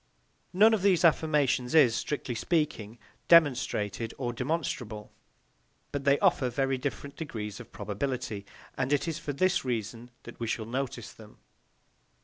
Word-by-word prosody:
None 215 Hz, +5 st, +5 dB
of 215 Hz, -, +1 dB
these 185 Hz, -3 st, +3 dB
affirmations 150 Hz, -5 st, +2 dB
is, 135 Hz, -8 st, +6 dB
strictly 135 Hz, +1 st, -3 dB
speaking, 120 Hz, -, -1 dB, 0.3 s
demonstrated 120 Hz, -, +3 dB
or 120 Hz, -2 st, -3 dB
demonstrable; 125 Hz, -6 st, -3 dB, 0.8 s
but 140 Hz, -1 st, -4 dB
they 140 Hz, 0 st, +5 dB
offer 130 Hz, -2 st, +2 dB
very 135 Hz, +1 st, 0 dB
different 140 Hz, +1 st, -5 dB
degrees 105 Hz, -10 st, -6 dB
of -, -, -12 dB
probability, 110 Hz, -1 st, -4 dB, 0.3 s
and 130 Hz, +1 st, -2 dB
it 145 Hz, +3 st, +1 dB
is 165 Hz, -, -3 dB
for 145 Hz, -, -4 dB
this 185 Hz, +6 st, +1 dB
reason 120 Hz, -1 st, -4 dB
that 120 Hz, -, -11 dB
we 115 Hz, -, -3 dB
shall 110 Hz, 0 st, -2 dB
notice 130 Hz, +3 st, -4 dB
them. -, -, -15 dB
135 Hz, 140 wpm, -29 LUFS, 115-150 Hz, 0.8 s, is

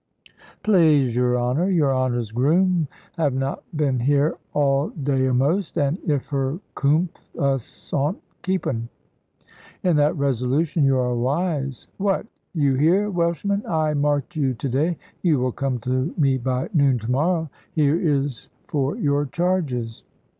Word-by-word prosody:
"Plaize 155 Hz, -, +4 dB
your 125 Hz, 0 st, +2 dB
honour, 130 Hz, +10 st, +1 dB
your 150 Hz, -8 st, +2 dB
honour's 120 Hz, -4 st, -1 dB
groom 165 Hz, +7 st, +2 dB, 0.3 s
have 145 Hz, -5 st, +1 dB
not 135 Hz, +1 st, -2 dB, 0.2 s
been 140 Hz, -4 st, +1 dB
here 145 Hz, +5 st, +2 dB, 0.2 s
all 140 Hz, 0 st, +2 dB
day 135 Hz, -3 st, 0 dB
a'most; 140 Hz, +9 st, +1 dB
and 145 Hz, +5 st, +1 dB
if 145 Hz, -4 st, +1 dB
her 135 Hz, +1 st, -1 dB, 0.2 s
coom'th, 155 Hz, +5 st, +1 dB, 0.2 s
us 135 Hz, -4 st, -2 dB
'ont 145 Hz, +7 st, 0 dB, 0.2 s
keep 185 Hz, 0 st, -1 dB
un." 115 Hz, -1 st, -2 dB, 0.9 s
"In 175 Hz, -4 st, +3 dB
that 150 Hz, +3 st, +2 dB
resolution 140 Hz, +4 st, +1 dB
you 135 Hz, -1 st, +4 dB
are 125 Hz, -1 st, +1 dB
wise. 140 Hz, +1 st, -1 dB
What! 195 Hz, +1 st, 0 dB, 0.3 s
you 140 Hz, -4 st, +2 dB
here, 175 Hz, +10 st, +3 dB
Welshman? 175 Hz, +3 st, 0 dB
I 155 Hz, -2 st, +1 dB
marked 145 Hz, +2 st, 0 dB
you 135 Hz, -4 st, 0 dB
to 135 Hz, -, -3 dB
day. 150 Hz, +7 st, 0 dB, 0.2 s
You 165 Hz, -5 st, +3 dB
will 125 Hz, 0 st, 0 dB
come 135 Hz, 0 st, -2 dB
to 130 Hz, +6 st, -1 dB
me 135 Hz, -4 st, +2 dB
by 130 Hz, -, -2 dB
noon 140 Hz, -5 st, +4 dB
to 115 Hz, +1 st, -4 dB
morrow. 160 Hz, +3 st, +1 dB, 0.2 s
Here 150 Hz, -1 st, +3 dB
is 145 Hz, -7 st, -1 dB, 0.2 s
for 140 Hz, -1 st, -1 dB
your 145 Hz, 0 st, +1 dB
charges." 140 Hz, -10 st, -1 dB
140 Hz, 145 wpm, -23 LUFS, 130-165 Hz, 0.9 s, Plaize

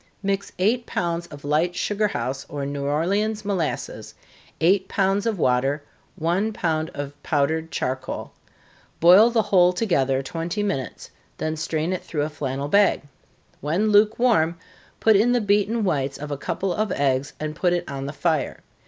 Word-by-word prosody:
_ -, -, -33 dB, 0.2 s
Mix 200 Hz, 0 st, -1 dB
eight 225 Hz, +6 st, +1 dB
pounds 170 Hz, 0 st, -2 dB
of 145 Hz, -1 st, -11 dB
light 160 Hz, +4 st, +1 dB
sugar 210 Hz, +1 st, 0 dB
house 135 Hz, -8 st, -3 dB
or 140 Hz, -1 st, -4 dB
New 140 Hz, 0 st, -4 dB
Orleans 200 Hz, +9 st, 0 dB
molasses, 190 Hz, -6 st, -3 dB, 0.4 s
eight 190 Hz, +3 st, +3 dB
pounds 195 Hz, +2 st, +1 dB
of 220 Hz, -3 st, 0 dB
water, 135 Hz, +1 st, +1 dB, 0.3 s
one 175 Hz, +7 st, 0 dB
pound 160 Hz, -5 st, -1 dB
of 145 Hz, 0 st, -5 dB
powdered 160 Hz, +3 st, 0 dB
charcoal. 130 Hz, -2 st, -3 dB, 0.7 s
Boil 185 Hz, +7 st, +7 dB
the 230 Hz, -2 st, +2 dB
whole 180 Hz, -3 st, +4 dB
together 135 Hz, -, +1 dB
twenty 170 Hz, +8 st, -3 dB
minutes, 185 Hz, -11 st, -4 dB, 0.3 s
then 155 Hz, 0 st, -2 dB
strain 160 Hz, +2 st, -2 dB
it 185 Hz, -, -4 dB
through 150 Hz, -3 st, -2 dB
a 150 Hz, -, -2 dB
flannel 140 Hz, -2 st, -3 dB
bag. 200 Hz, +2 st, +3 dB, 0.6 s
When 180 Hz, +9 st, 0 dB
lukewarm, 210 Hz, -5 st, +3 dB, 0.4 s
put 220 Hz, -1 st, +5 dB
in 230 Hz, +5 st, +4 dB
the 245 Hz, -, +3 dB
beaten 210 Hz, +2 st, +1 dB
whites 140 Hz, -7 st, 0 dB
of 150 Hz, 0 st, -7 dB
a -, -, -1 dB
couple 185 Hz, +6 st, -2 dB
of 215 Hz, +1 st, -1 dB
eggs, 135 Hz, -1 st, 0 dB
and 155 Hz, 0 st, -4 dB
put 175 Hz, +2 st, +1 dB
it 175 Hz, 0 st, 0 dB
on 135 Hz, 0 st, -5 dB
the -, -, -3 dB
fire. 155 Hz, +1 st, -1 dB
170 Hz, 165 wpm, -23 LUFS, 145-200 Hz, 0.7 s, Boil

